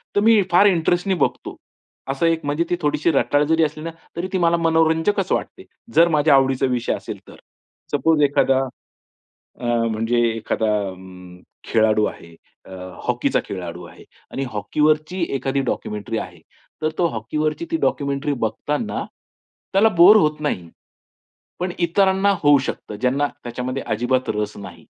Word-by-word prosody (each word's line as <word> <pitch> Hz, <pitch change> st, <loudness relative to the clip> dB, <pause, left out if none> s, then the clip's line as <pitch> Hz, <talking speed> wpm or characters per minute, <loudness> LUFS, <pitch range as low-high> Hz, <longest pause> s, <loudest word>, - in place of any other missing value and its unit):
तर -, -, +4 dB
मी 220 Hz, -1 st, +5 dB
फार 180 Hz, +4 st, +6 dB
इंटरेस्टने 175 Hz, +1 st, +1 dB
बघतो. -, -, -2 dB, 0.5 s
असं 135 Hz, +5 st, 0 dB
एक 165 Hz, -1 st, 0 dB
म्हणजे 145 Hz, +4 st, 0 dB
ती 175 Hz, -, +1 dB
थोडीशी 150 Hz, +2 st, +1 dB
रटाळ 145 Hz, +1 st, +2 dB
जरी 160 Hz, 0 st, +3 dB
असली 155 Hz, +1 st, -3 dB
ना, 165 Hz, -, -4 dB, 0.2 s
तरी 175 Hz, +2 st, -3 dB
ती -, -, +2 dB
मला 170 Hz, 0 st, +3 dB
मनोरंजकच 165 Hz, +4 st, +1 dB
वाटते, -, -, -2 dB, 0.3 s
जर 170 Hz, +1 st, +6 dB
माझ्या 150 Hz, 0 st, +4 dB
आवडीचा 135 Hz, 0 st, +2 dB
विषय 125 Hz, -1 st, -1 dB
असेल -, -, -6 dB
तर. -, -, -13 dB, 0.6 s
सपोज 150 Hz, +1 st, +2 dB
एखादा 135 Hz, -1 st, +3 dB, 1.0 s
अ, -, -, -7 dB, 0.3 s
म्हणजे 115 Hz, +2 st, 0 dB, 0.2 s
एखादा 110 Hz, 0 st, -2 dB, 0.2 s
अं, 90 Hz, -1 st, -12 dB, 0.2 s
खेळाडू 110 Hz, -1 st, +2 dB
आहे. 85 Hz, 0 st, -8 dB, 0.3 s
अ, -, -, -15 dB, 0.4 s
हॉकीचा -, -, +1 dB
खेळाडू 90 Hz, -2 st, -7 dB
आहे -, -, -15 dB, 0.3 s
आणि 135 Hz, -, -2 dB
हॉकीवरची 155 Hz, -, 0 dB
एखादी 135 Hz, +1 st, -1 dB
डॉक्युमेंटरी 105 Hz, +2 st, -4 dB
आहे. 90 Hz, -3 st, -8 dB, 0.4 s
तर 155 Hz, -, +2 dB
तो 175 Hz, -, +3 dB
हॉकीवरची 150 Hz, -, -3 dB
ती 325 Hz, -, +1 dB
डॉक्युमेंटरी 140 Hz, +1 st, 0 dB
बघताना 150 Hz, -, -2 dB, 0.7 s
त्याला 205 Hz, +4 st, +5 dB
बोर 195 Hz, +5 st, +9 dB
होत 150 Hz, -6 st, +2 dB
नाही. 90 Hz, -, -3 dB, 0.9 s
पण 180 Hz, 0 st, -2 dB
इतरांना 190 Hz, +3 st, +2 dB
होऊ 145 Hz, -1 st, +6 dB
शकतं 105 Hz, -, -6 dB
ज्यांना 135 Hz, +3 st, +1 dB, 0.2 s
त्याच्यामध्ये 125 Hz, +2 st, -4 dB
अजिबात 125 Hz, +4 st, 0 dB
रस 105 Hz, 0 st, -3 dB
नाही. 90 Hz, -4 st, -10 dB
145 Hz, 145 wpm, -21 LUFS, 115-165 Hz, 1.0 s, बोर